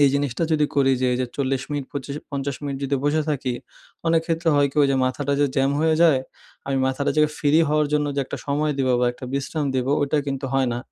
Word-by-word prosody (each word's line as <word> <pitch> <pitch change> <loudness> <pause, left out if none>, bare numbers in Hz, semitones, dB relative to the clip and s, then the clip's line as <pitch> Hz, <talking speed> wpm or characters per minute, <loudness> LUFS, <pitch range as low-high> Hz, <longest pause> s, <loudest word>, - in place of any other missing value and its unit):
এই 140 - +7
জিনিসটা 140 -1 -1
যদি 150 -1 +3
করি 135 -1 +4
যে, 130 - +2
এইযে 125 +1 0
৪০ 135 -1 0
মিনিট 145 -2 -2
২৫ 140 0 -5 0.2
৫০ 140 -1 -3
মিনিট 140 -1 -3
যদি 140 0 0
বসে 150 +2 +2
থাকি, 130 -4 -1 0.5
অনেক 165 0 +4
ক্ষেত্রে 165 0 0
হয় 145 0 +4
কি - - -20
ওই - - +5
যে 135 - +2
মাথাটা 140 +2 -1
যে 145 - +4
জ্যাম 135 +1 +3
হয়ে 160 0 +3
যায়, 155 -6 +5 0.5
আমি 135 -1 0
মাথাটা 130 +2 0
যে 155 - +5 0.2
ফ্রি 145 - +1 0.2
হওয়ার 150 0 +2
জন্য 150 0 +2
যে 140 - +2
একটা - - -6
সময় 150 +1 0
দিবো 130 -1 +2
বা 125 - +3
একটা 130 - -10
বিশ্রাম 145 +2 -2
দিবো 130 +1 0
ওইটা 145 +1 +1
কিন্তু 135 -1 -3
হয় 135 -2 +2
না। 120 - -2
140 Hz, 235 wpm, -23 LUFS, 135-150 Hz, 0.5 s, এই